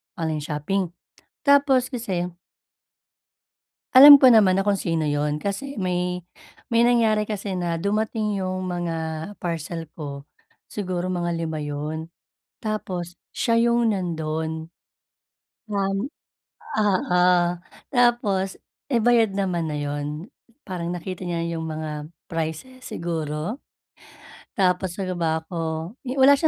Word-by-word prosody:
Online 160 -2 -2
shopping. 175 +4 -2 0.5
Tapos 275 -3 +5
kasi 190 -7 -2 1.7
alam 285 +3 +12
ko 265 -2 +7
naman 200 -5 +6
na 195 - +2
kung 200 -1 +1
sino 165 -2 0
'yun 145 0 0
kasi 200 - -4
may 180 -2 -1 0.5
may 235 +1 +5
nangyari 220 -3 +3
kasi 200 -3 -3
na 170 -1 -1
dumating 210 +2 -1
'yung 185 0 -2
mga 175 -2 -2 0.4
parcel 165 -1 -4
ko, 140 -3 -7 0.5
siguro 185 -2 -2
mga 175 -1 -1
lima 160 -2 -3
'yun, 150 +2 -4 0.5
tapos, 185 -5 -4 0.2
siya 230 -1 +1
'yung 235 -1 +3
nandun. 160 -3 -3 1.0
Namin 195 +3 -1 0.7
oo. 185 -3 +2 0.7
Tapos 235 -7 +2 0.3
eh, 235 -5 +1
bayad 230 -4 +4
naman 180 -4 0
na 150 - -3
'yun, 145 +5 -4 0.3
parang 175 -3 -4
nakita 185 0 -6
niya 170 -1 -1
'yung 165 -1 -3
mga 155 -1 -5 0.2
prices 165 +11 -4
siguro? 165 - -3 1.0
Tapos 180 -1 +1
ano 185 -2 -2
ba 165 -2 0
ako, 160 +1 -4
eh 260 +1 -5
wala, 270 +1 +8
180 Hz, 115 wpm, -24 LUFS, 160-215 Hz, 1.7 s, alam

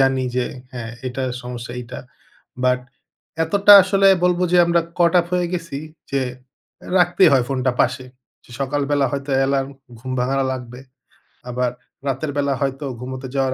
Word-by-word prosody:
জানি 135 -1 +2
যে, 125 - +1 0.3
"হ্যাঁ 120 -2 -6 0.2
এটার 130 0 -3
সমস্যা 120 -1 -7
এইটা।" 120 +1 -8 0.6
বাট 125 0 +3 0.6
এতটা 200 +5 +5
আসলে 195 +1 +3 0.2
বলবো 180 0 +2
যে 180 - +5
আমরা 170 0 +3 0.2
caught 170 0 +3
up 170 - -7
হয়ে 180 -1 +1
গেছি, 170 -5 -4 0.3
যে 140 - 0 0.6
অ্যা - - -11
রাখতেই 180 +1 +5
হয় 130 -3 +4
ফোনটা 130 -1 0
পাশে। 130 -1 -2 0.4
যে - - -21
সকালবেলা 140 +1 0
হয়তো 140 0 -4
অ্যালার্ম 135 0 +1 0.3
ঘুম 130 +2 -7
ভাঙানো 135 +2 0
লাগবে। 125 -1 -7 0.7
আবার 125 0 -1 0.4
রাতের 140 +3 -2
বেলা 140 -1 +1
হয়তো 135 +1 -2
ঘুমোতে 130 +1 -6
যাওয়ার 135 -1 +1
135 Hz, 155 wpm, -21 LUFS, 130-160 Hz, 0.7 s, এতটা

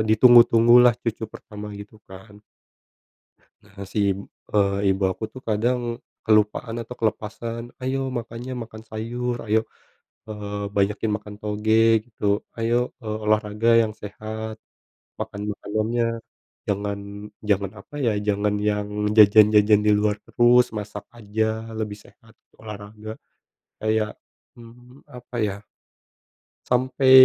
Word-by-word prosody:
ditunggu-tunggulah 120 +1 +7
cucu 110 -2 -4
pertama 105 -1 -9
gitu 105 +1 -12
kan. 100 +2 -13 1.2
Nah 100 0 -22
nah 100 -1 -7
si, 105 - 0 0.5
eee, 100 -1 +3
ibu 95 0 0
aku 110 - -7
tuh 130 - -9
kadang 120 +4 +1 0.5
kelupaan 110 +1 +2
atau 125 - -8
kelepasan, 115 +1 -3 0.2
ayo 130 +1 0 0.2
makanya 120 +2 -6
makan 110 -1 -11
sayur, 120 +3 -3
ayo, 110 +1 +3 0.7
eee, 105 -1 -5
banyakin 105 +2 +1
makan 105 0 -11
toge 105 +1 -1 0.3
gitu. 110 -3 -11 0.3
Ayo, 115 +1 0 0.3
eee, 110 0 -3
olahraga 105 +1 +1
yang 110 -1 -2
sehat, 110 +1 -6 0.7
makan 100 - -5
makanannya 110 +4 -1 0.6
jangan 100 0 -2 0.5
jangan 100 -1 +1
apa 145 - -18
ya, - - +4 0.2
jangan 105 0 +1
yang 105 0 -1 0.3
jajan-jajan 105 0 +7
di - - +5
luar 105 0 +1
terus, 120 +1 +5
masak 105 -1 -7
aja 110 0 -1 0.3
lebih 105 -2 -3
sehat, 115 0 -21 0.3
olahraga. 105 0 -9 0.7
Kayak, 110 0 +1 0.5
mmm, 120 +3 -16
apa 125 0 -9
ya 100 - -3 1.1
sampai 130 +1 +2
110 Hz, 115 wpm, -24 LUFS, 105-115 Hz, 1.2 s, ditunggu-tunggulah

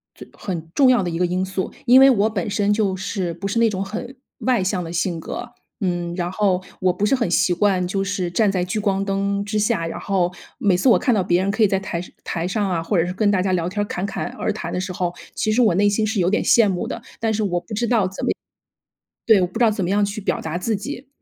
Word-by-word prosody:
最 - - -11
很 165 -4 -5
重 270 -3 +5
要 245 -5 +4
的 175 - -2
一 165 - -3
个 180 - +2
因 185 +2 -1
素。 190 0 -3
因 255 +2 +7
为 270 - +8
我 220 -3 +3
本 205 -2 -3
身 205 0 +1
就 205 -3 +1
是， 185 -2 -3
不 175 +4 -5
是 215 +4 0
那 230 - +4
种 195 -2 -2
很 240 +6 -6 0.2
外 250 -5 +1
向 185 -1 -1
的 165 - -6
性 170 0 -1
格。 240 +8 -7 0.3
嗯， 175 -3 -2
然 175 -1 -2
后 190 -2 +1 0.2
我 185 - +3
不 185 +3 -1
是 210 - +2
很 240 -9 +1
习 175 +1 +3
惯 185 -1 +1
就 195 +1 -1
是 195 -3 -2
站 205 +1 +2
在 185 -2 0
聚 200 +4 -2
光 195 -1 0
灯 200 0 -1
之 210 +1 -1
下， 210 -5 +1
然 165 - -5
后 180 -3 0 0.2
每 200 -3 +2
次 185 +9 +3
我 - - +6
看 250 - +1
到 205 - +2
别 175 0 +2
人 200 - +1
可 220 - -2
以 215 - +6
在 195 0 0
台 175 -3 -4 0.2
台 170 0 -3
上 200 +1 -1
啊， 170 -3 0
或 185 +4 -1
者 165 - +3
是 180 - -3
跟 205 +2 +1
大 190 -2 +2
家 190 - 0
聊 175 -1 0
天 205 +2 -2
侃 180 - -4
侃 200 - -3
而 - - 0
谈 - - -5
的 180 - -1
时 190 - -4
候， 175 -1 -2 0.2
其 215 - 0
实 240 - +3
我 215 -8 +4
内 205 +2 +3
心 210 +2 +1
是 220 -1 -1
有 180 +1 +2
点 215 - +1
羡 230 -3 +5
慕 185 -3 -2
的， - - -4 0.2
但 225 -1 0
是 215 0 0
我 175 -3 -1
不 215 - -7
知 235 +3 0
道 215 -5 +2
怎 190 - -5
么 - - +2 1.0
对， 220 -4 +6
我 180 - +2
不 185 - -6
知 240 - +4
道 220 - +4
怎 200 -3 -2
么 180 - -1
样 205 +1 +3
去 205 +1 -4
表 - - -1
达 160 +1 -4
自 215 +4 -1
己。 265 +5 -7
195 Hz, 305 characters per minute, -21 LUFS, 180-215 Hz, 1.0 s, 为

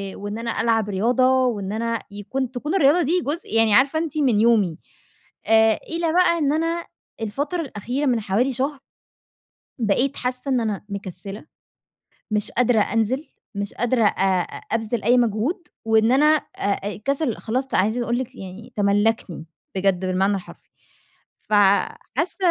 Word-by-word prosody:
وإن 205 +1 -5
أنا 230 0 -2
ألعب 225 -2 +1
رياضة، 255 +6 +3
وإن 205 -5 -2
أنا 230 +1 -1
يكون 240 +6 -4
تكون 295 +7 -3
الرياضة 335 -1 +4
دي 340 +4 +1
جزء 295 - -3
يعني 225 -2 +4
عارفة 275 +7 +4
أنتِ 315 -2 -4
من 250 -8 +3
يومي. 210 -8 +3 0.7
آآ، 220 0 +4
إلى 330 -1 -1
بقى 360 -1 +4
إن 290 -1 +1
أنا 330 +2 -1 0.4
الفترة 285 +11 -2
الأخيرة 260 +1 -3
من 245 -4 +1
حوالي 225 +7 0
شهر 270 +3 -2 1.0
بقيت 245 +5 +1
حاسة 250 0 -2
إن 260 -2 +2
أنا 210 -3 -3
مكسلة 195 - -6 0.9
مش 210 -1 0
قادرة 245 -2 +3
أنزل 230 +8 0 0.3
مش 200 0 -4
قادرة 240 0 +1
آآ، 190 -2 +2 0.3
أبذل 225 0 -1
أي 245 +4 +4
مجهود 240 - 0 0.2
وإن 220 +1 +3
أنا 275 +4 +4 0.3
آآ، 200 0 -1
الكسل 260 - -1
خلاص 255 +4 -2
ت - - -4
عايزة 220 +6 +1
أقول 235 0 -1
لِك 260 0 -6
يعني 200 +5 -10
تملكني 205 -4 +1 0.3
بجد 190 -1 +1
بالمعنى 190 +2 +1
الحرفي. 185 - -13 0.7
ف - - -8 0.6
حاسة 330 +5 0
230 Hz, 150 wpm, -22 LUFS, 205-270 Hz, 1.0 s, الرياضة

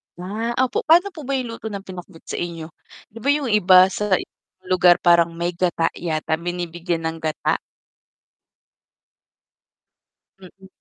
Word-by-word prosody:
Ah, 215 +7 -4
opo 255 - -1
paano 350 +5 +5
po 310 - -9
ba 275 - 0
yung 250 -3 -3
luto 225 -1 -7
ng 200 -2 -6
pinakbet 180 -2 -11
sa - - -5
inyo? 165 -2 -6 0.4
'Di 225 - -11
ba 280 - -1
yung 285 -5 -2
iba 185 -3 +6
sa 210 -1 +1
ibang 185 +1 -11
lugar 180 -1 +6
parang 170 -1 +5
may 170 +1 -2
gata 170 -2 0
yata, 160 -2 -3
binibigyan 175 -1 -4
ng 160 0 -3
gata? 155 -1 -1 2.8
Mm. 190 +1 -15
180 Hz, 145 wpm, -21 LUFS, 170-210 Hz, 2.8 s, iba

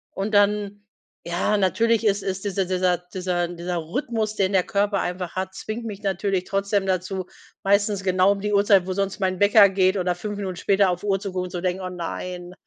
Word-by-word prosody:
Und 200 +3 -3
dann, 205 0 +2 0.4
ja, 175 +5 0
natürlich 225 +3 +2
ist 200 0 +1
es 190 0 -3
dieser 195 -2 -1
dieser 180 -1 -1
dieser 175 0 -4
Rhythmus, 215 - -2
den 195 -1 0
der 185 - +4
Körper 200 +1 0
einfach 180 0 -4
hat, 190 0 -3
zwingt 215 +4 -6
mich 210 -3 -6
natürlich 195 -1 -1
trotzdem 195 0 0
dazu, 185 0 -2 0.3
meistens 200 0 +1
genau 185 +1 +3
um 200 - -2
die 210 0 -1
Uhrzeit, 200 -2 +4
wo 185 - -1
sonst 195 +1 -2
mein 185 -2 -1
Wecker 205 0 +7
geht 190 0 +2
oder 180 -1 0
5 205 +3 -5
Minuten 190 -3 -4
später 195 +2 +2
auf 180 +2 -3
Uhr 195 -1 +1
zu 195 -1 -5
gucken 185 0 -2
und 180 - -9
zu 175 - -4
denken: 185 +1 -2
„Oh 185 - -3
nein, 180 0 -6
195 Hz, 205 wpm, -23 LUFS, 180-205 Hz, 0.4 s, Wecker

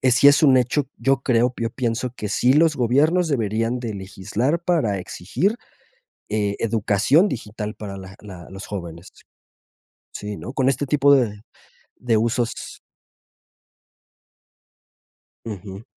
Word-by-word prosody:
eh, 130 - +3
sí 125 +3 +5
es 145 +3 +4
un 135 -3 +6
hecho, 130 +3 +1
yo 135 +3 +2
creo 125 -1 +2
yo 115 -1 -1
pienso 125 0 -2
que 105 - -4
sí 125 +5 +3
los 155 0 +4
gobiernos 150 +8 +2
deberían 115 -1 0
de 115 -3 -4
legislar 105 - -2
para 150 - +1
exigir, 100 - -2 0.7
eh, 105 -1 0
educación 115 - +3
digital 105 - -5
para 100 -2 -7
la 95 0 -10
la 95 -5 -11
los 95 +1 -9
jóvenes. 85 -3 -7 1.0
Sí, 105 0 -6
¿no?, 125 - -7
con 130 -1 +2
este 140 +2 -2
tipo 140 0 +4
de 110 -6 0 0.6
de 115 -3 +1
usos. 115 +1 -2 2.7
Ujú. 100 -2 -7
115 Hz, 130 wpm, -22 LUFS, 105-135 Hz, 2.7 s, un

